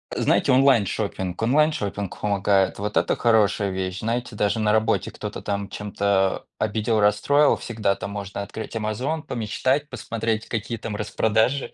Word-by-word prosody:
знаете, - - +2
онлайн-шоппинг. 105 -8 +2
Онлайн-шоппинг 115 - 0
помогает. 100 -2 +1
Вот 105 +1 -3
это - - +2
хорошая 105 -3 +2
вещь. 95 0 -3
Знаете, 120 +1 -3
даже 105 +2 0
на 105 -1 +2
работе 110 0 +1
кто-то - - -6
там 100 -1 -3
чем-то 100 -2 0
обидел, 110 +1 0
расстроил, 105 +9 +4
всегда 105 -4 -1
там 100 - -6
можно 100 0 -5
открыть 110 +3 -7
"Амазон", 125 +9 -2
помечтать, 130 +5 -1
посмотреть, 115 -1 -3
какие 115 0 -3
там 110 -1 -5
распродажи. 110 +5 0
105 Hz, 140 wpm, -24 LUFS, 100-115 Hz, -, расстроил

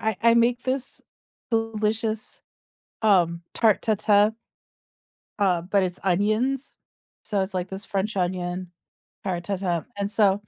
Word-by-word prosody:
I 220 -2 0
I 230 0 +6
make 235 +1 +3
this 260 0 -2 0.5
delicious, 225 0 -1 0.6
um, 175 -6 +3
tarte 220 -3 +3
tatin 210 0 +3 1.0
uh, 185 -4 +3
but 195 +3 +1
it's 180 -1 -2
onions. 215 +9 +1 0.5
So 205 -3 0
it's 190 0 -4
like 180 0 -2
this 195 +1 -5
French 200 +2 -2
onion 180 -1 -2 0.5
tarte 175 -2 -2
tatin, 180 -3 -1
and 200 0 -1
so, 205 -2 +3
205 Hz, 125 wpm, -25 LUFS, 185-220 Hz, 1.0 s, I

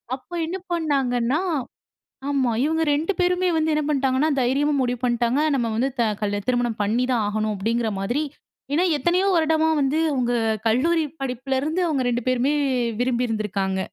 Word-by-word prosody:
அப்போ 345 +6 -11
என்ன 360 +4 -4 0.2
பண்ணாங்கன்னா, 270 -4 0 0.9
ஆமா 270 -4 +1
இவங்க 320 +1 +1
2 320 +7 0
பேருமே 360 0 +2
வந்து 315 0 +1
என்ன 305 - +1
பண்டாங்கன்னா 270 +1 +1
தைரியமா 275 +4 +1
முடிவு 245 -1 -1
பண்ட்டாங்க. 240 +3 +1
நம்ம 240 -3 0
வந்து 250 +5 +1
த - - +4 0.2
கல் 205 -1 -1
திருமணம் 240 -3 0
பண்ணி 230 +5 +1
தான் 235 - +1
ஆகணும் 215 0 -1
அப்டின்கிற 225 +3 0
மாதிரி. 240 +10 -1 0.5
ஏன்னா 350 +4 +3
எத்தனையோ 350 +7 +1
வருடமா 320 -1 +2
வந்து 280 +3 +1
அவங்க 245 -2 0 0.3
கல்லூரி 315 +8 +2 0.2
படிப்பிலருந்து 270 +6 -2
அவங்க 270 -5 0
2 240 -1 -2
பேருமே 255 +4 +1 0.5
விரும்பிருந்திருக்காங்க. 215 -6 -1
260 Hz, 145 wpm, -23 LUFS, 235-310 Hz, 0.9 s, த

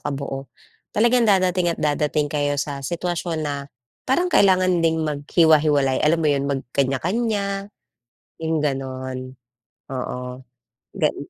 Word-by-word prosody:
kabuo, 135 -2 -4 0.5
talagang 235 +1 +4
dadating 185 -2 +3
at 170 - -1
dadating 150 0 0
kayo 145 -1 0
sa 140 -1 -3
sitwasyon 170 +1 -3
na 140 -1 -4 0.4
parang 355 +7 +1
kailangan 185 -2 +4
ding 160 -1 +1
maghiwa-hiwalay 150 -2 +3
alam 155 +2 +3
mo 160 -2 +1
'yon, 140 0 -1
magkanya-kanya, 195 - -1 0.7
'yong 160 0 0
gano'n. 130 -3 -4 0.6
Oo, 125 0 -5 0.5
gan 155 -6 0
150 Hz, 110 wpm, -22 LUFS, 140-180 Hz, 0.7 s, talagang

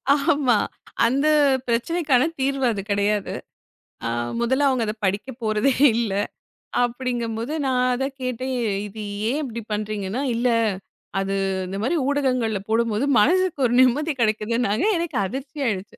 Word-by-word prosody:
ஆமா. 280 -6 +2 0.5
அந்தப் 275 0 +3
பிரச்சனைக்கான 260 +2 +2 0.2
தீர்வு 270 0 0
அது 200 -2 -3
கிடையாது. 205 0 0 0.7
அ - - -1 0.3
முதல்ல 265 +4 +2
அவங்க 255 -3 +1
அதப் 215 0 -5
படிக்கப்போறதே 220 +4 0 0.2
இல்ல. 230 -4 0 0.7
அப்படிங்கும்போது, 240 +1 -2
நா 265 - +1 0.2
அதக் 270 +2 -3
கேட்டேன். 255 +1 -3
ஏ - - 0 0.2
இது 215 +1 -8 0.3
ஏன் 295 +4 0
இப்படி 235 -3 -5
பண்றீங்கன்னா, 210 +2 -3
இல்ல 245 +1 +1 0.7
அது 195 0 -1 0.3
இந்த 195 +1 -5
மாரி 265 +9 0
ஊடகங்கள்ல 255 -7 +1
போடும்போது 230 +2 +1
மனசுக்கு 365 - +2
ஒரு 240 - -1
நிம்மதி 290 +5 +3
கிடைக்குதுன்னாங்க. 220 - +1
எனக்கு 340 -1 -2
அதிர்ச்சியாயிருச்சு. 260 -6 -4
245 Hz, 125 wpm, -23 LUFS, 215-275 Hz, 0.7 s, அந்தப்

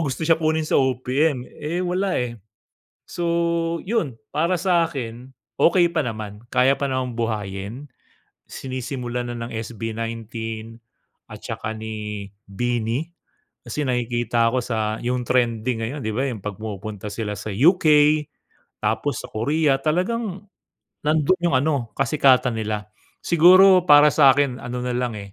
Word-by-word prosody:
gusto 145 0 -2
siya 165 0 +3
kunin 155 0 +1
sa 155 - +2
OPM, 130 +1 0
eh, 170 +7 -4
wala 185 +1 0
eh. 120 -3 -3 0.7
So 175 - -3 0.6
yun, 170 - -2 0.2
para 170 +3 +1
sa 175 -3 +3
akin 125 -3 -7 0.3
okey 175 0 +4
pa 160 -5 -1
naman, 110 -1 -6
kaya 130 +2 +4
pa 140 - -2
namang 130 -3 -2
buhayin. 110 +3 -4 0.6
Sinisimulan 125 -2 -5
na 120 - -5
ng 115 0 -6
SB19 115 0 -5 1.0
at - - -11
saka 110 +1 -5
ni 105 -2 -6 0.2
BINI, 120 - -2 0.5
kasi 150 - -4
nakikita 120 -1 +1
ko 130 - +1
sa 110 -2 -2
yung 125 0 -1
trending 115 -1 0
ngayon, 135 +6 -4
'di 110 - -2
ba, 135 +4 0
yung 110 -6 -6
'pag 105 -1 -5
pumupunta 105 -1 -6
sila 105 0 -4
sa 110 - -7
UK, 155 - +3 1.0
tapos 115 +4 -1
sa - - -7
Korea, 140 +4 +1
talagang 190 +5 -1 0.6
nandun 155 +4 +2
yung 170 -6 +2
ano 140 -5 -1
kasikatan 135 -4 +3
nila. 105 -1 -4 0.3
Siguro 180 +2 +6
para 145 0 +7
sa'kin 140 -2 +4
ano 125 0 -4
nalang, 125 -2 -2
eh, 100 -1 -10
125 Hz, 135 wpm, -22 LUFS, 115-155 Hz, 1.0 s, para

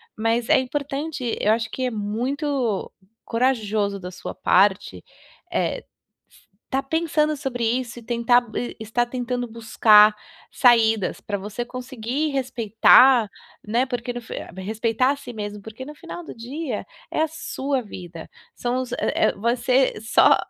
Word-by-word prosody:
Mas 225 +1 0
é - - +5
importante 275 -1 -3
eu 210 - +3
acho 225 0 0
que 260 - -4
é - - -3
muito 240 +2 -2 0.4
corajoso 215 -5 0
da 180 0 -7
sua 180 - -7
parte, 190 - +2 0.5
eh, - - -1 0.8
estar 270 +1 0
pensando 305 0 0
sobre 260 -4 -3
isso 240 +1 -1
e - - -14
tentar 240 +1 +3
e 245 - -3
estar 225 +2 0
tentando 245 0 -3
buscar 215 -2 +5 0.4
saídas 225 -5 +3
pra 205 -1 -3
você 205 +5 -5
conseguir 255 +3 -3
respeitar, 245 -1 +5 0.4
né, 235 +5 +1
porque 245 -1 -4
no 245 - -4
fin 225 - -9 0.2
respeitar 225 +6 0
a - - -1
si 275 -3 -10
mesmo, 205 -1 -6
porque 220 +5 -9
no 300 - -9
final 345 +2 -8
do - - -9
dia, 250 +1 -5 0.3
é - - 0
a 320 - +2
sua 275 -4 -3
vida, 175 -5 -9 0.3
são 245 +1 -1
os 250 - -7
eh - - -2 0.2
eh, - - +3
vai 235 +4 0
ser 250 -1 +1
só 220 - +5
240 Hz, 150 wpm, -23 LUFS, 220-265 Hz, 0.8 s, é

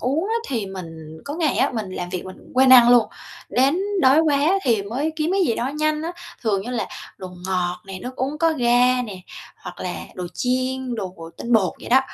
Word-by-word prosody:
uống 280 +7 0
á 455 - 0
thì 230 -7 -2
mình 165 -4 -9
có 290 - -5
ngày 320 -4 0
á, - - +2
mình 215 -5 -3
làm 180 -1 -5
việc 180 -1 -4
mình 185 0 -9 0.2
quên 260 0 +6
ăn 240 -2 +9
luôn, 240 -2 +6 0.4
đến 275 +7 +2 0.2
đói 270 +3 +6
quá 310 +4 +3
thì 230 -5 +2
mới 265 +10 -2
kiếm 315 +1 0
cái 390 - +2
gì 230 - +1
đó 240 - -2
nhanh 305 0 0
á, 335 +2 -3 0.3
thường 200 -4 +1
như 245 - -6
là 240 -2 -2 0.3
đồ 185 -1 -7 0.2
ngọt 180 -1 -1
nè, 190 -1 -7
nước 255 +1 -7
uống 275 +4 -2
có 330 0 +3
ga 250 -2 +3
nè, 200 -6 -7 0.4
hoặc - - -10
là - - -3 0.2
đồ 180 -1 -5
chiên, 255 0 -1
đồ 190 -5 -5 0.2
tinh 240 - -4
bột 205 -6 +3
vậy - - -9
đó. 260 +2 +6
250 Hz, 225 wpm, -22 LUFS, 195-280 Hz, 0.4 s, ăn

